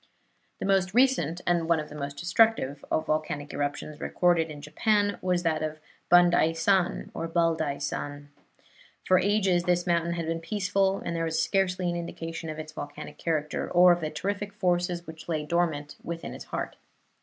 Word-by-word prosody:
The - - -4
most 195 0 +2
recent 210 - +3
and 170 -1 +1
one 165 -1 +4
of 150 - -6
the - - -10
most 140 -1 -5
destructive 175 - +2
of 155 - 0
volcanic 155 -2 -2
eruptions 145 +1 -3
recorded 175 -2 +2
in 150 -1 -8
Japan 205 +8 +1
was 180 -1 0
that 160 -2 +1
of 155 0 -3 0.3
Bandaisan 175 +1 +3
or 165 - -3
Baldaisan. 145 -3 -1 0.8
For 185 -1 +5
ages 190 -4 +2
this 175 0 +2
mountain 170 -1 +1
had 170 -1 -3
been 165 +1 -2
peaceful, 195 +2 0
and 170 - -2
there 165 0 0
was 160 0 -1
scarcely 185 +1 +1
an 175 - -1
indication 165 -1 -5
of 155 - -5
its 155 0 -7
volcanic 145 0 -8
character 155 -2 -1
or 180 0 +7
of 175 0 +2
the 155 - -2
terrific 200 +6 -3
forces 180 -3 0
which 160 0 -10
lay 155 -2 -1
dormant 160 -3 0
deep - - -28
within 170 0 -5
its - - -9
heart. - - -4
170 Hz, 175 wpm, -27 LUFS, 155-180 Hz, 0.8 s, or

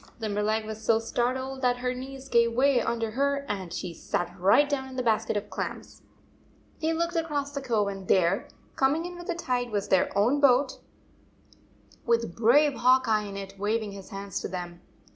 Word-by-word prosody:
Limberleg 215 0 -1
was 220 0 -7
so 225 0 +4
startled 260 +3 -2
that 250 -1 +2
her 250 0 -1
knees 265 +1 -8
gave 235 -2 +3
way 260 0 +3
under 230 -1 -1
her 280 +3 0
and 190 -4 -4
she 180 0 -4
sat 175 +2 -3
right 200 +11 +5
down 270 -2 -2
in 260 - -10
the 255 - -1
basket 220 -2 +1
of 205 0 -5
clams! - - -6 0.8
They 320 +1 +1
looked 340 +2 -1
across 295 -4 -1
the 280 -1 -4
cove, 220 -6 +1
and 195 -1 -6
there, 185 +1 +2 0.3
coming 285 +5 +2
in 355 0 -6
with 350 0 -9
the 350 - -1
tide, 250 -7 -1
was 205 -3 -2
their 190 - +3
own 240 +8 +3
boat, 265 -1 +3 1.2
with 230 -6 0
brave 280 +6 +4
Hawk 255 +1 +4
Eye 215 -1 +2
in 200 -1 -7
it 195 0 -8
waving 215 +1 -1
his 195 -1 -10
hand 195 0 -7
to - - -3
them. 175 -1 -6
235 Hz, 190 wpm, -27 LUFS, 205-270 Hz, 1.2 s, right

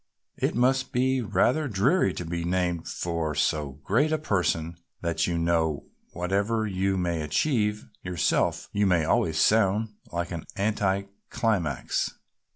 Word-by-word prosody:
It - - 0
must 130 +2 +2
be 130 +1 +2
rather 120 +8 +2
dreary 120 - +2
to 90 - -4
be 85 +1 -3
named 90 -1 -1
for 85 -3 -2
so 75 -2 0
great 125 - +2
a 155 - +2
person 85 - -1 0.2
that 85 -1 0
you 85 -1 -1
know 85 -3 0 0.2
whatever 100 +5 0
you 95 -1 0
may 85 -3 -1
achieve 105 - 0 0.2
yourself 90 -4 0
you 105 0 +2
must 85 -4 +3
always 80 0 +1
sound 110 +2 +3 0.2
like 85 0 -3
an 85 -3 -5
anti 100 -1 0 0.3
climax." 90 - -1
95 Hz, 140 wpm, -27 LUFS, 85-110 Hz, 0.3 s, must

